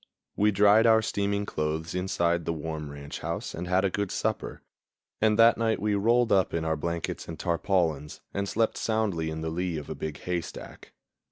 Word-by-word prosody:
We 105 +1 +3
dried 105 +3 +5
our 110 -1 +5
steaming 100 -1 -1
clothes 80 -1 -3
inside 85 -2 0
the 85 - 0
warm 80 -1 -5
ranch 70 0 -8
house - - -4
and 85 +2 -5
had 95 +2 +2
a 95 - +1
good 100 0 -1
supper, - - -3 0.6
and 110 -1 +3
that 115 +1 +6
night 110 -1 +1
we 105 0 0
rolled 115 +4 +3
up 95 -3 +3
in 80 -1 -1
our 80 0 +1
blankets 85 +2 -4
and 80 - -6
tarpaulins, 85 -4 0
and 100 0 -2
slept 115 0 0
soundly 105 -8 0
in 80 0 -5
the 80 0 -3
lee 90 0 -2
of 75 - -7
a - - -1
big 75 -2 -5
haystack. 90 -2 -6
90 Hz, 190 wpm, -27 LUFS, 80-105 Hz, 0.6 s, that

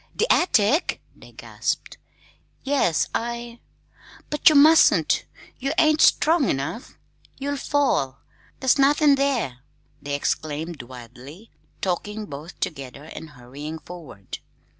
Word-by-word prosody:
"The - - +1
attic!" 290 - +2 0.2
they - - -16
gasped. - - -4 0.6
"Yes, 270 - +1
I 235 0 -4 0.3
" - - -23
"But 295 - +5
you 310 - +2
mustn't! 310 +3 +5 0.3
you 275 +3 -2
ain't 310 0 +4
strong 320 -3 +4
enough! 140 - -4 0.4
you'll 285 +1 -3
fall! 270 - 0 0.4
there's 260 +1 +3
nothin' 290 +1 +5
there!" 265 - 0 0.4
they 145 0 -3
exclaimed 155 +2 -3
wildly, 130 - -12 0.3
talking 210 +3 -3
both 150 +1 -10
together 140 -2 -5
and 160 +1 -10
hurrying 145 +4 -9
forward. 160 - -10
200 Hz, 115 wpm, -23 LUFS, -, 0.6 s, But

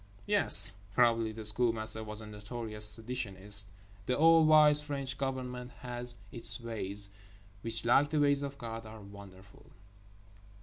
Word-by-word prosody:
Yes, - - +7 0.2
probably 115 -2 -1
the 110 0 -12
Schoolmaster 110 0 +1
was 105 0 -4
a - - -12
notorious 105 0 -1
seditionist. 105 -3 0 0.4
The 125 - -3
all 165 +1 +2
wise 150 -1 +3
French 140 -2 -7
Government 130 -2 -8
has 120 -1 -7 0.2
its 120 +2 -1
ways, 105 -4 -1 0.5
which 115 0 -5
like 135 +5 0
the 155 0 -4
ways 145 -1 0
of 140 0 -9
God 115 -3 -10
are 110 0 -14
wonderful. 100 -1 -18
115 Hz, 135 wpm, -28 LUFS, 105-130 Hz, 0.5 s, Yes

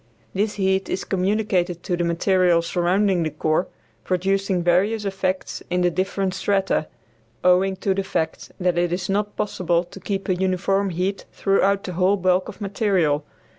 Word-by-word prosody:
This 205 +2 0
heat 190 -1 0
is - - -2
communicated 185 -3 0
to 180 - -1
the 175 - -1
material 175 0 +2
surrounding 180 +2 +1
the 160 - 0
core, 155 +3 0 0.4
producing 190 0 0
various 200 +5 +2
effects 190 -1 -2
in 180 0 +1
the 175 0 +3
different 190 +1 -1
strata, 195 -6 0 0.6
owing 185 +2 +4
to 190 +1 0
the 195 +1 -1
fact 160 -4 -3
that 180 -1 +1
it 175 -1 +1
is 180 +1 -2
not 205 +1 -1
possible 175 -4 0
to 180 +2 -12
keep 195 +1 -3
a 185 - +2
uniform 190 +2 0
heat 185 +3 -2
throughout 195 0 +2
the 185 - -5
whole 185 +3 +2
bulk 185 0 +1
of - - -10
material. 190 -7 +1
185 Hz, 165 wpm, -23 LUFS, 175-195 Hz, 0.6 s, owing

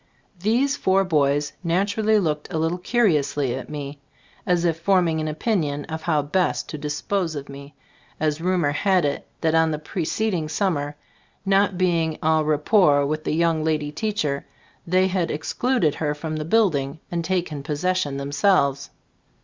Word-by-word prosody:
These 245 +9 +1
four 190 +1 +2
boys 145 -3 +1
naturally 200 +5 +2
looked 155 -6 -1
a - - -2
little 165 +3 0
curiously 155 - +1
at 130 - -6
me, 145 -1 -6 0.5
as 175 -1 +2
if 165 -1 0
forming 170 -3 +2
an 155 - -2
opinion 155 -3 -1
of 160 0 -5
how 155 -4 +1
best 175 +6 0
to 155 - -6
dispose 160 +4 -2
of 140 -1 -6
me, 140 +1 -11 0.4
as 155 0 0
rumor 175 -4 +1
had 185 +2 +2
it 145 - -2
that 160 -1 +1
on 160 0 +4
the 155 - -1
pre 160 +3 -4
ceding 180 -3 -1
summer, 150 -5 -1 0.5
not 195 -1 +2
being 170 -3 +1
en 160 0 +3
rapport 150 -1 +3
with 155 +2 -3
the - - 0
young 165 -1 +1
lady 155 -2 -1
teacher, 155 -6 -2 0.4
they 185 +2 +3
had 185 -2 0
excluded 170 - 0
her 150 -1 -2
from 155 +1 -4
the 155 - -3
building 160 -7 +1
and 170 -1 -1
taken 170 -4 -2
possession 150 0 -1
themselves. 140 0 +1
160 Hz, 160 wpm, -23 LUFS, 150-185 Hz, 0.5 s, on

